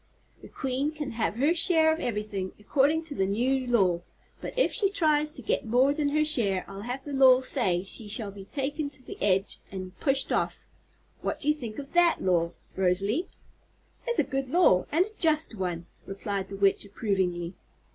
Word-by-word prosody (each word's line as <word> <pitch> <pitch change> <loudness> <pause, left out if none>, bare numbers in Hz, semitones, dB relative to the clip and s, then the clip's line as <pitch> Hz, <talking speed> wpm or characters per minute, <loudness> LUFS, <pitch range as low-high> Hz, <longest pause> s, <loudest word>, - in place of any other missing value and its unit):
The - - -11
Queen 270 +2 -2
can 300 -3 -5
have 225 -2 -1
her 285 +8 +2
share 320 -2 +4
of 320 - -4
ever'thing, 210 - -3
'cordin' 300 +3 +2
to 315 -2 -7
the 190 -7 0
new 250 +6 0
law, 190 -8 +2 0.4
but - - -7
if - - +2
she 400 -4 +2
tries 305 -6 +1
to 260 - -11
get - - 0
more 255 +5 +3
than 290 -1 0
her 305 +1 +2
share 205 -11 +2
I'll 195 0 -8
have 250 +4 -5
the 290 - -6
law 260 -1 +6
say 195 -10 0
she 210 +2 -3
shall 205 -1 -2
be 195 -1 -11
taken 285 +4 -3
to 275 -2 -9
the - - -9
edge 195 0 +1
an' 185 -1 -6
pushed 270 -1 +1
off. - - 0 0.6
What - - -3
do 295 - -1
you - - +5
think 235 -8 -7
of 280 0 -8
that 345 -1 +5
law, 170 -2 +1 0.2
Rosalie?" 195 - 0 0.8
"It's 480 - 0
a - - +4
good 270 -1 -3
law, 275 - +4
and 335 +5 +3
a - - -11
just 315 -4 +3
one," 180 -4 -4 0.2
replied 195 0 -4
the 195 - -7
Witch 195 0 +3
approvingly. 190 -4 -2
250 Hz, 195 wpm, -27 LUFS, 195-295 Hz, 0.8 s, law